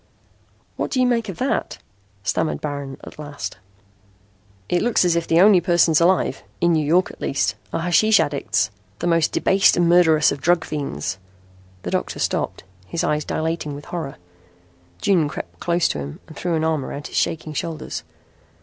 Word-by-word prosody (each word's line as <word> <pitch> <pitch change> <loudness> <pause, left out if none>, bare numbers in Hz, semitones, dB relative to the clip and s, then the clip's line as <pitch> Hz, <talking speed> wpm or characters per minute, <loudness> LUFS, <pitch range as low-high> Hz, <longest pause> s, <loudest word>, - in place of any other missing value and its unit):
"What - - -2
do 260 - -1
you 255 - +4
make 230 -3 +1
of 180 - -6
that?" 265 - -1 0.5
stammered 155 - 0
Baron 140 -2 -5
at - - -11
last. 145 -9 -6 1.1
"It 175 - +1
looks 235 -5 +2
as 175 -1 +3
if 170 0 -1
the 165 - +4
only 195 -1 +7
persons 170 -2 +3
alive, 180 +2 +2 0.2
in 170 0 +3
New 155 -1 +2
York 170 +5 +2
at - - -17
least, 135 - 0 0.2
are - - -2
hashish 210 +6 +4
addicts 110 -7 0 0.3
the - - -4
most 165 -2 +2
debased 195 -2 +3
and 175 -1 +3
murderous 165 -3 +5
of 140 - -5
drug 175 +2 +2
fiends." 95 - -4 0.6
The - - -4
doctor - - -2
stopped, - - -2 0.2
his 165 - -2
eyes 150 0 +1
dilating 160 -2 -2
with 145 - -9
horror. 160 -6 -5 0.9
June 170 -7 +3
crept - - -8
close 175 0 +1
to - - -2
him 70 0 -7
and 155 - -13
threw 175 +2 -1
an 160 - 0
arm 160 -3 +1
around 145 +2 -6
his - - -5
shaking 155 -1 -1
shoulders. 160 +1 -4
165 Hz, 175 wpm, -22 LUFS, 145-175 Hz, 1.1 s, only